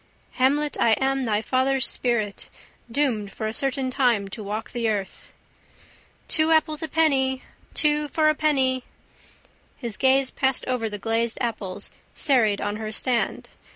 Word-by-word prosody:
Hamlet, 285 +3 +1
I 225 - +4
am 270 +2 0
thy 215 -1 0
father's 260 +1 +2
spirit 225 -6 -1 0.4
Doomed 230 -7 0
for 220 - -5
a 215 - -2
certain 270 +1 -1
time 245 -7 +2
to 215 +2 -7
walk 210 +3 -5
the 235 -2 -1
earth. 200 -3 -4 1.0
—Two 315 0 +2
apples 310 -1 +2
a 320 - -3
penny! 270 -5 +1 0.3
Two 300 -1 +3
for 310 +1 +1
a 310 - +5
penny! 265 -4 +1 0.9
His 235 -6 -2
gaze 265 0 +3
passed 265 -2 0
over 250 -3 -1
the 210 - -5
glazed 225 +2 -1
apples 215 -6 -4 0.2
serried 225 -8 +2
on 205 0 -2
her 215 -1 -5
stand. 240 +2 0
255 Hz, 150 wpm, -24 LUFS, 220-275 Hz, 1.0 s, a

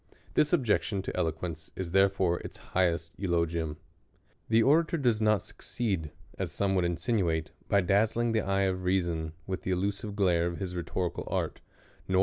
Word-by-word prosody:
This 150 - +3
objection 110 - +1
to - - -4
eloquence 80 0 -3
is 90 -3 -4
therefore 95 -2 +3
its - - -8 0.2
highest 85 -3 +1
eulogium. 85 -4 0 0.7
The 115 0 +5
orator 165 +5 +4
does 120 -7 +2
not 110 -3 +3
succeed, 95 -10 -3 0.3
as - - -2
some 100 -1 0
would 90 -2 +2
insin 85 +6 0
uate, 80 -3 0 0.2
by 100 - +4
dazzling 110 +5 +2
the 110 -1 +2
eye 95 0 +1
of 95 -1 0
reason 85 -4 0
with 95 -1 -3
the - - -4
illusive 100 +3 -1
glare 90 -4 +3
of 85 -1 -3
his 90 -2 -4
rhetorical 85 0 -3
art, - - -2 0.5
nor. 95 0 +3
95 Hz, 165 wpm, -29 LUFS, 85-105 Hz, 0.7 s, The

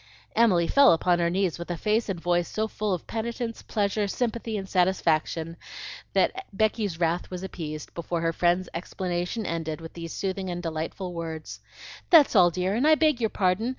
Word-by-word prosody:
Emily 200 -7 +4
fell 280 -6 +6
upon 175 +1 +2
her 170 0 +2
knees 185 -1 0
with 170 - -7
a 175 - -2
face 215 +4 0
and 185 -3 -2
voice 175 0 +1
so 220 0 -2
full 215 -1 -3
of 180 -3 -2
penitence, 230 +1 -4
pleasure, 205 0 0
sympathy, 230 0 -2
and 195 -1 -5
satisfaction, 170 -3 +1 0.6
that 385 0 +1
Becky's 205 -4 0
wrath 170 +1 0
was 180 0 -6
appeased 155 -5 -6
before 170 0 -3
her 165 0 0
friend's 175 +2 +2
explanation 180 +4 -3
ended 160 -2 -3
with 165 0 -9
these 165 -1 -7
soothing 190 -1 -3
and 175 0 -4
delightful 165 +3 -4
words, 160 -2 -6 0.5
"That's 320 -6 +7
all, 175 - +7
dear, 180 +3 -1
and 250 +7 +2
I 310 - +7
beg 305 -5 +2
your 220 - +2
pardon. 195 +5 +1
180 Hz, 185 wpm, -26 LUFS, 170-215 Hz, 0.6 s, That's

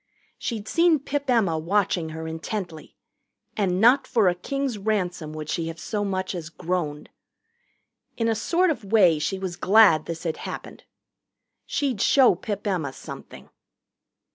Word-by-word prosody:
She'd 220 -3 -4
seen 335 -1 +4
Pip 280 0 -4
Emma 200 -10 +2
watching 175 -1 0
her 160 0 -6
intently, 160 0 -6 0.6
and 185 -3 0
not 245 +6 +5
for 220 -5 +3
a 180 - +4
king's 265 +5 -3
ransom 185 -6 -2
would 155 -1 -6
she 165 +1 -2
have 165 0 -7
so 210 +3 -3
much 190 -1 -2
as 165 -3 -6
groaned. 165 -3 -3 1.1
In 230 - 0
a 225 - +2
sort 340 - +1
of 265 - -4
way 180 -8 +5
she 155 +6 -1
was 190 -2 -4
glad 190 -4 +5
this 165 -1 -5
had 165 -2 -2
happened. - - -8 0.8
She'd 260 -8 -1
show 265 -6 +5
Pip 205 +3 -5
Emma 170 -9 -1
something. - - -11
190 Hz, 150 wpm, -24 LUFS, 165-225 Hz, 1.1 s, not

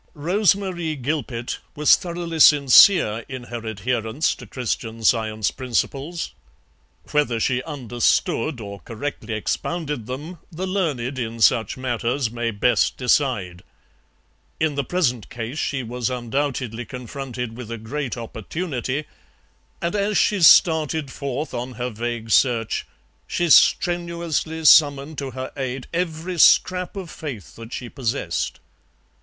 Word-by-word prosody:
Rose 180 +6 +3
Marie 175 -5 -3
Gilpet 130 -3 -3 0.2
was 150 0 +6
thoroughly 170 -2 -5
sincere 140 - +7
in 130 -2 -6
her 120 -1 -4
adherence 115 - -1
to - - -12
Christian 115 -2 -4
Science 110 -2 +2
principles; 135 +6 -3 0.8
whether 145 -6 +1
she 125 +2 +1
understood 125 0 0
or 100 -2 -7
correctly 115 -2 -5
expounded 150 +2 -3
them 150 +7 -6
the 175 +3 -4
learned 145 -10 -2
in 115 -1 -4
such 115 +3 +3
matters 125 0 -1
may 120 0 -2
best 115 +3 +1
decide. 120 -9 +1 1.0
In 155 -1 +1
the 140 0 -1
present 130 - -1
case 120 +5 -5
she 135 -3 -1
was 120 +1 -3
undoubtedly 125 -1 -2
confronted 125 -1 -6
with 120 -2 -8
a 115 - -4
great 125 +4 -4
opportunity, 130 - -4 0.8
and 170 +3 -1
as 205 0 +1
she 205 -3 +2
started 160 -3 +5
forth 140 +2 -4
on 125 +1 -4
her 125 +1 -4
vague 115 0 -4
search 115 -3 +2 0.4
she 175 -2 0
strenuously 170 -2 +2
summoned 145 0 +5
to 140 -2 -4
her 130 +1 -6
aid 130 -1 -4
every 170 0 -2
scrap 180 +5 +4
of 185 -4 -6
faith 130 - -8
that 115 0 -10
she 125 - -5
possessed. 120 - -3
130 Hz, 125 wpm, -22 LUFS, 115-160 Hz, 1.0 s, sincere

